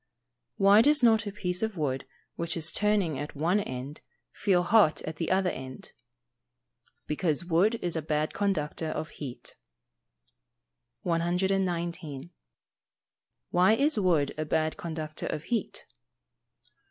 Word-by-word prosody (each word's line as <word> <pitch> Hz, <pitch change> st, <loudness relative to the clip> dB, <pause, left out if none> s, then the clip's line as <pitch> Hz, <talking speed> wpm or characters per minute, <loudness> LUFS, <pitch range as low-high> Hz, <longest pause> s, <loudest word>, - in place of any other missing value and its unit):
Why 200 Hz, +2 st, +7 dB
does 290 Hz, +1 st, +4 dB
not 225 Hz, -2 st, +4 dB
a -, -, -3 dB
piece 180 Hz, -2 st, -3 dB
of 220 Hz, -3 st, -2 dB
wood 135 Hz, -4 st, -2 dB, 0.3 s
which 170 Hz, 0 st, -2 dB
is 160 Hz, -1 st, -1 dB
turning 200 Hz, -9 st, +1 dB
at 145 Hz, +1 st, -6 dB
one 170 Hz, +8 st, +2 dB
end, 135 Hz, -4 st, -6 dB, 0.3 s
feel 185 Hz, -4 st, +2 dB
hot 200 Hz, -4 st, +4 dB
at 155 Hz, -1 st, -6 dB
the 165 Hz, -, -2 dB
other 185 Hz, -1 st, +2 dB
end? 130 Hz, 0 st, -8 dB, 1.1 s
Because 155 Hz, +2 st, -1 dB
wood 180 Hz, +7 st, +3 dB
is 175 Hz, -2 st, 0 dB
a 160 Hz, -, -1 dB
bad 155 Hz, 0 st, -1 dB
conductor 165 Hz, -6 st, -1 dB
of 155 Hz, 0 st, -4 dB
heat. 130 Hz, -5 st, -8 dB, 1.5 s
119. 175 Hz, -3 st, -1 dB, 1.2 s
_Why 185 Hz, +5 st, +5 dB
is 290 Hz, -3 st, +2 dB
wood 165 Hz, -7 st, +2 dB
a -, -, +1 dB
bad 155 Hz, +1 st, 0 dB
conductor 155 Hz, -2 st, -5 dB
of 150 Hz, -, -3 dB
heat? 235 Hz, +6 st, -3 dB
170 Hz, 130 wpm, -28 LUFS, 155-195 Hz, 1.5 s, Why